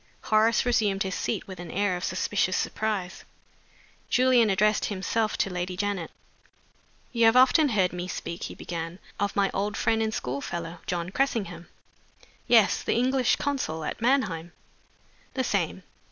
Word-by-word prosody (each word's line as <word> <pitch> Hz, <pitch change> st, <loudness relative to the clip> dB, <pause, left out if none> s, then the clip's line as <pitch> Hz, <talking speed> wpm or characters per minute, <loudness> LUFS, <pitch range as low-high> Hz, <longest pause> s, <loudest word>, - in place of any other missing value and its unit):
Horace 220 Hz, +2 st, +3 dB
resumed 210 Hz, -5 st, +2 dB
his 190 Hz, -1 st, -3 dB
seat -, -, -2 dB
with 190 Hz, -3 st, -9 dB
an 175 Hz, -1 st, -7 dB
air 200 Hz, -1 st, 0 dB
of 180 Hz, -, -5 dB
suspicious 185 Hz, 0 st, 0 dB
surprise. 205 Hz, -4 st, -2 dB, 0.9 s
Julian 250 Hz, -3 st, +4 dB
addressed 210 Hz, +2 st, +2 dB
himself 215 Hz, +2 st, -1 dB
to 195 Hz, -, 0 dB
Lady 180 Hz, 0 st, -3 dB
Janet. 200 Hz, -4 st, -2 dB, 1.0 s
"You 235 Hz, -2 st, +3 dB
have 225 Hz, +1 st, +5 dB
often 260 Hz, +4 st, +6 dB
heard 190 Hz, -6 st, +1 dB
me 180 Hz, 0 st, -4 dB
speak," 170 Hz, -1 st, -5 dB
he -, -, -7 dB
began, 165 Hz, 0 st, -5 dB, 0.2 s
"of 205 Hz, 0 st, -1 dB
my 200 Hz, -1 st, +2 dB
old 205 Hz, +1 st, -2 dB
friend 225 Hz, -1 st, +1 dB
and 220 Hz, 0 st, 0 dB
school 140 Hz, -8 st, -3 dB
fellow, 170 Hz, +1 st, -5 dB
John 175 Hz, 0 st, -2 dB
Cressingham?" 200 Hz, -10 st, -1 dB, 0.8 s
"Yes. 230 Hz, -4 st, +5 dB
The -, -, 0 dB
English 255 Hz, +1 st, +2 dB
consul 260 Hz, -, -2 dB
at -, -, -4 dB
Mannheim?" 205 Hz, -10 st, +1 dB, 0.8 s
"The 260 Hz, -, 0 dB
same. 190 Hz, -5 st, -1 dB
200 Hz, 155 wpm, -27 LUFS, 180-230 Hz, 1.0 s, often